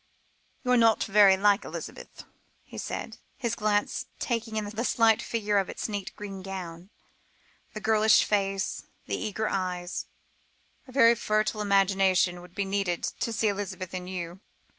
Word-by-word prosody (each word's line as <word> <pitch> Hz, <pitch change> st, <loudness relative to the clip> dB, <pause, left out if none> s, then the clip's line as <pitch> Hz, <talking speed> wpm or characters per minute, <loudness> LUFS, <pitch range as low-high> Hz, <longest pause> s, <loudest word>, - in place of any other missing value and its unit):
"You 250 Hz, -, 0 dB
are 250 Hz, -, +5 dB
not 225 Hz, -2 st, +4 dB
very 195 Hz, -1 st, +6 dB
like 205 Hz, +1 st, +3 dB
Elizabeth," -, -, -8 dB, 0.4 s
he -, -, -9 dB
said, -, -, -5 dB, 0.2 s
his 235 Hz, -4 st, -2 dB
glance 210 Hz, -2 st, 0 dB
taking 230 Hz, -2 st, -2 dB
in 215 Hz, -1 st, -1 dB
the 220 Hz, +3 st, -3 dB
slight 225 Hz, -3 st, +3 dB
figure 210 Hz, -3 st, 0 dB
in 195 Hz, -, -2 dB
its -, -, -4 dB
neat 205 Hz, -3 st, -4 dB
green 195 Hz, -2 st, -7 dB
gown 185 Hz, -2 st, -7 dB, 0.9 s
the 215 Hz, -, -5 dB
girlish 220 Hz, 0 st, +5 dB
face, 195 Hz, -2 st, -1 dB, 0.2 s
the -, -, -2 dB
eager 215 Hz, +1 st, -2 dB
eyes; 180 Hz, -2 st, -3 dB, 0.8 s
"a -, -, -12 dB
very 235 Hz, -3 st, +6 dB
fertile 215 Hz, -2 st, 0 dB
imagination 195 Hz, -3 st, +3 dB
would 180 Hz, 0 st, -15 dB
be 200 Hz, -, -1 dB
needed 195 Hz, -3 st, -1 dB, 0.2 s
to 230 Hz, -, -1 dB
see 225 Hz, 0 st, 0 dB
Elizabeth 190 Hz, -3 st, -3 dB
in 180 Hz, -1 st, -5 dB
you." 180 Hz, -1 st, -5 dB
205 Hz, 155 wpm, -28 LUFS, 190-220 Hz, 0.9 s, very